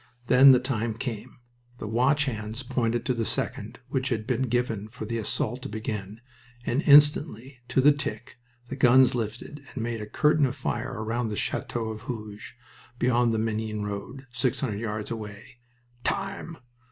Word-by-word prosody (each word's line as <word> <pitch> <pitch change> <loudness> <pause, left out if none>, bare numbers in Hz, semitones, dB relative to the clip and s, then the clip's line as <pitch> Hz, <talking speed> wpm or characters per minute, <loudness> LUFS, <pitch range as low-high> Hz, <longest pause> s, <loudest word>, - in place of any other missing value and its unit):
Then 130 +2 +8
the 125 - +6
time 120 -4 -1
came. 115 -3 -6 0.4
The - - -6
watch 130 +6 +2
hands 110 -1 -4
pointed 120 -1 -1
to 130 - +1
the 115 -2 -1
second - - -3
which 130 0 -1
had 110 -3 -1
been 130 +1 0
given 115 -4 -1
for 110 0 -8
the 115 +1 -2
assault 115 +3 -2
to - - -6
begin, 105 0 -5 0.4
and 125 +5 +1
instantly, 145 -4 +4
to 125 +2 +2
the 145 +3 +7
tick, 120 -6 -5 0.3
the 135 - -4
guns 130 0 +6
lifted 115 +5 -4 0.2
and 120 - -2
made 115 -1 -3
a 105 - -6
curtain 150 +3 +3
of 130 - -5
fire 120 -3 -3
round 115 +1 -1
the - - -2
Chateau 115 -2 -2
of 110 -1 -6
Hooge, 110 -1 -7 0.4
beyond 120 -1 +3
the 110 - 0
Menin 110 -1 -2
road, 105 +7 -6
six 125 +1 -1
hundred 110 -7 -2
yards 110 -1 -4
away. 110 +3 -8 0.4
"Time!" 195 -4 -3
120 Hz, 170 wpm, -27 LUFS, 110-130 Hz, 0.4 s, Then